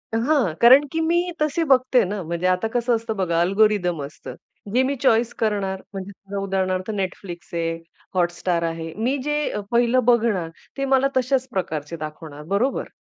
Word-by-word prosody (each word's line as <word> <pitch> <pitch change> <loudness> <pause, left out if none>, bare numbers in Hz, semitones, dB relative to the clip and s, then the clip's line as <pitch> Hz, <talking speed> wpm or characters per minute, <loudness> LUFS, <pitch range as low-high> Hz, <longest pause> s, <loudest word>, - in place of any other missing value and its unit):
हां, 240 - +2
कारण 260 +5 +8
की 325 - -1
मी 345 +2 +1
तसे 305 +2 +1
बघते 255 -1 +4
ना. 200 +2 -4
म्हणजे 170 +2 -2
आता 185 +4 +1
कसं 240 0 +2
असतं 225 -1 -3
बघा 170 -3 0
अल्गोरिदम 190 -3 +2
असतं. 145 - -10 0.4
जे 255 +2 +4
मी 275 +2 0
चॉइस 235 -1 +3
करणार 200 -3 -1
म्हणजे 195 +1 -8
उदाहरणार्थ 190 -1 -1
Netflix 185 -3 -5
आहे, 165 -1 -1 0.4
हॉटस्टार 175 -1 0
आहे. 165 -1 -4
मी 250 +6 0
जे 295 +1 -1 0.2
अ, - - -3
पहिलं 240 +1 +3
बघणार 225 -8 +2 0.3
ते 275 - -1
मला 270 0 +3
तश्याच 260 0 +1
प्रकारचे 160 -4 -3
दाखवणार, 155 -1 -8
बरोबर. 200 - -1
200 Hz, 160 wpm, -22 LUFS, 175-250 Hz, 0.4 s, कारण